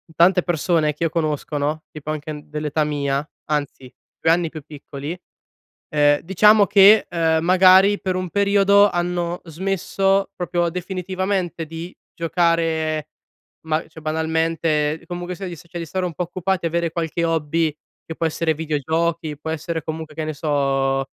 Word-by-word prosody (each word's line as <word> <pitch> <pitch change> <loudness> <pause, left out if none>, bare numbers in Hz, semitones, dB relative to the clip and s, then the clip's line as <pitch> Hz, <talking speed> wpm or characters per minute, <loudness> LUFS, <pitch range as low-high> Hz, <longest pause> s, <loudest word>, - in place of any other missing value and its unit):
tante 180 +1 +4
persone 165 -2 +1
che 150 - -5
io - - +1
conosco, 155 -2 -2
no, 150 +2 -2
tipo 155 0 -6
anche 150 0 -5
dell'età 150 0 -1
mia, 145 -1 -1 0.2
anzi 145 -4 -3 0.3
2 160 - +4
anni 170 -1 +2
più 155 -1 -8
piccoli, 145 +2 -7 0.7
ehm, 145 -1 +3
diciamo 205 +3 +5
che, 205 +3 +6
ehm, 160 -2 +1
magari 185 +3 +6
per 185 -2 -1
un 185 -1 -3
periodo 200 +1 +4
hanno 175 0 -2
smesso 195 +3 0
proprio 175 -1 -1
definitivamente 185 0 -3
di 165 +3 -8 0.2
giocare 165 -2 0 0.6
ma, 155 0 0
cioè 160 0 -13
banalmente 160 -1 0
comunque 175 0 -5
sia 195 +1 -6
di 175 -2 -7
cioè, 170 +2 -9
di 165 - -4
stare 185 +3 -2
un 175 - -4
po' 180 - -2
occupati 185 +1 -2
e - - +1
avere 170 0 -1
qualche 170 0 -2
hobby 160 -1 0 0.3
che 160 - -7
può 165 - -2
essere 160 0 0
videogiochi, 160 +1 -1
può 160 - -6
essere 160 0 -3
comunque, 160 -1 -6
che 160 - -3
ne 155 - -3
so, 135 -2 0
165 Hz, 155 wpm, -21 LUFS, 155-180 Hz, 0.7 s, che